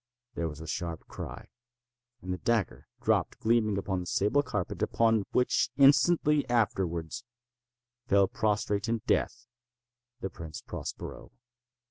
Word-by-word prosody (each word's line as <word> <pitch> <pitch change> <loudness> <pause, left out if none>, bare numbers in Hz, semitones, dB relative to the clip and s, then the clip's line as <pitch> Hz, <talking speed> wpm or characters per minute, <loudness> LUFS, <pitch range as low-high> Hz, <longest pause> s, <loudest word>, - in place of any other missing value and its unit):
There 85 - -2
was 75 -1 -9
a 80 - -8
sharp 85 0 -4
cry—and 120 -3 -10
the 90 - -5
dagger 110 +1 0 0.2
dropped - - +1
gleaming 110 -3 +2
upon 95 -1 -1
the 90 - -6
sable 105 +10 +2
carpet, 105 -10 -4
upon 110 -3 +2
which, 125 - +2
instantly 145 +2 +5
afterwards, 95 -4 0 0.8
fell 100 -2 +4
prostrate 105 +1 0
in 115 -2 -1
death 120 -1 0 0.7
the 95 - -4
Prince 80 -2 -8
Prospero. - - -7
110 Hz, 120 wpm, -29 LUFS, 95-120 Hz, 0.8 s, instantly